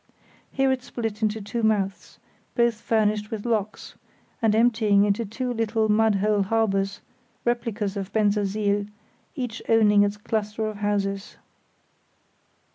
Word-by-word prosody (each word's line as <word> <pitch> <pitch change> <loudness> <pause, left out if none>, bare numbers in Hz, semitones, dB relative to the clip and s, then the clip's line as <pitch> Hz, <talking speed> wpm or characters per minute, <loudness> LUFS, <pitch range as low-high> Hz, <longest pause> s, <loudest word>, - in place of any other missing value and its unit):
Here 270 -1 +2
it 260 -1 -1
split 230 -3 -5
into 215 0 0
two 230 +4 -3
mouths, 200 -3 -1 0.4
both 235 -2 +2
furnished 215 -1 +1
with 220 -1 -5
locks, 220 -3 -2 0.5
and 220 -2 +3
emptying 220 -3 +4
into 210 +3 0
two 245 +4 -3
little 225 -1 0
mud 220 0 +3
hole 205 +1 +2
harbours, 195 -1 0 0.4
replicas 230 -4 -1
of 195 -1 -5
Bensersiel, 205 -1 +1 0.5
each 245 -5 -4
owning 210 -2 +5
its 205 0 +1
cluster 215 +1 -2
of 215 -1 -4
houses. 200 -1 -2
215 Hz, 125 wpm, -25 LUFS, 205-225 Hz, 0.5 s, owning